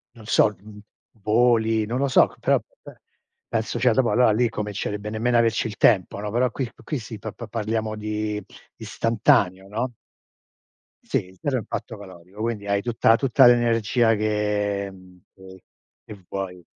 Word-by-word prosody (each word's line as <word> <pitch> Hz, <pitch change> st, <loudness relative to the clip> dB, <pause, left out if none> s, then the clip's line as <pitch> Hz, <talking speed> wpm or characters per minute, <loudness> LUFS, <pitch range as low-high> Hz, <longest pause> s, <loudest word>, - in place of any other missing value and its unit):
Non 110 Hz, -2 st, -14 dB
so, 105 Hz, -1 st, +3 dB
mhmm, 105 Hz, +1 st, -13 dB, 0.4 s
voli, 110 Hz, 0 st, +2 dB
non 120 Hz, +4 st, -3 dB
lo 140 Hz, -, +1 dB
so, 130 Hz, -, +4 dB
però -, -, +3 dB, 0.2 s
be -, -, -14 dB, 0.5 s
penso 115 Hz, +1 st, -2 dB
cioè 125 Hz, 0 st, +3 dB
dopo 120 Hz, -2 st, +2 dB
allora 125 Hz, +2 st, +4 dB
lì 120 Hz, +3 st, +2 dB
comincerebbe 105 Hz, -1 st, -4 dB
nemmeno 115 Hz, +3 st, +1 dB
a -, -, +5 dB
averci 115 Hz, 0 st, +1 dB
il 105 Hz, -, -8 dB
tempo, 100 Hz, -3 st, +3 dB
no. 105 Hz, 0 st, -4 dB
Però 125 Hz, +3 st, +1 dB
qui 130 Hz, -1 st, -4 dB
qui 150 Hz, -, -3 dB
sì 110 Hz, -1 st, -9 dB
pa 110 Hz, -, -6 dB
pa 115 Hz, +2 st, -9 dB
parliamo 110 Hz, 0 st, -2 dB
di 105 Hz, -1 st, -3 dB, 0.3 s
istantaneo, 95 Hz, -4 st, +1 dB
no. 115 Hz, +5 st, -3 dB, 1.1 s
Sì, 90 Hz, 0 st, -3 dB
zero 140 Hz, -3 st, 0 dB
impatto 115 Hz, -1 st, -5 dB
calorico, 95 Hz, 0 st, -12 dB
quindi 110 Hz, -3 st, -3 dB
hai 100 Hz, 0 st, +1 dB
tutta 115 Hz, 0 st, +3 dB
tutta 135 Hz, +1 st, +4 dB
l'energia 120 Hz, -1 st, +3 dB
che, 105 Hz, -1 st, -1 dB
mhmm, 95 Hz, -1 st, -17 dB, 0.2 s
che 95 Hz, -1 st, -15 dB, 0.4 s
che 100 Hz, -4 st, -12 dB
vuoi. 90 Hz, -2 st, -6 dB
110 Hz, 160 wpm, -23 LUFS, 100-115 Hz, 1.1 s, a